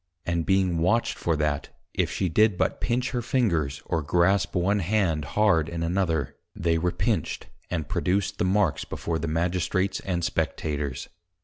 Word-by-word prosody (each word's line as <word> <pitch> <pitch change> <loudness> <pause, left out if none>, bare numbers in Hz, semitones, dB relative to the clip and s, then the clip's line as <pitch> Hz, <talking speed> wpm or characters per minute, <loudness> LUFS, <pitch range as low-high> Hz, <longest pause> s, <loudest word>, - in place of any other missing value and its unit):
And 85 -1 -1
being 95 -3 +2
watched 110 +8 +2
for 85 - 0
that, 75 -2 -1 0.2
if - - 0
she 95 - -1
did 105 +3 +3
but - - 0
Pinch 125 +2 0
her 125 -2 -1
Fingers, 85 - 0
or 80 -2 -1
Grasp 85 +8 +2
one 95 +4 +2
Hand 90 -5 +1
hard 85 -7 +4
in 85 -1 -3
another, 85 -4 0 0.2
they 80 0 +1
were 90 +2 +1
Pinched, 100 +5 -1 0.2
and 80 -4 -2
produced 95 +5 0
the - - +2
Marks 95 -6 +2
before 80 -1 -3
the 80 - -3
Magistrates, 90 +4 0
and 90 -3 -2
Spectators. 75 -4 -2
85 Hz, 165 wpm, -26 LUFS, 80-100 Hz, 0.2 s, hard